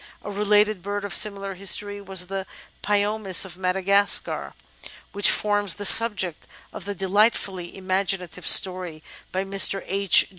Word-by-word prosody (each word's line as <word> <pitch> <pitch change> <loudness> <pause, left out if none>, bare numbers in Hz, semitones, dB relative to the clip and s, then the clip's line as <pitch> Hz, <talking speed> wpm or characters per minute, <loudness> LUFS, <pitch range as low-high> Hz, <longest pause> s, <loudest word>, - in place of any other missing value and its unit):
A 205 - -7
related 210 0 0
bird 205 +1 -5
of 200 - -5
similar 200 -2 +2
history 205 +2 -1
was 190 -2 0
the 195 +1 -6 0.3
^pyomis 205 -2 0
of 180 -3 -10
Madagascar, 195 +2 0 0.6
which 205 0 +3
forms 205 -3 -1
the 205 - -5
sub 230 +1 +6
ject 175 -5 -5 0.3
of - - -9
the 205 0 -5
delightfuUy 195 -2 -1
imaginative 185 -2 -3
story 180 -4 +2 0.3
by 190 +1 -3
Mr. 195 0 +1
H. 195 0 +4
195 Hz, 140 wpm, -22 LUFS, 185-205 Hz, 0.6 s, sub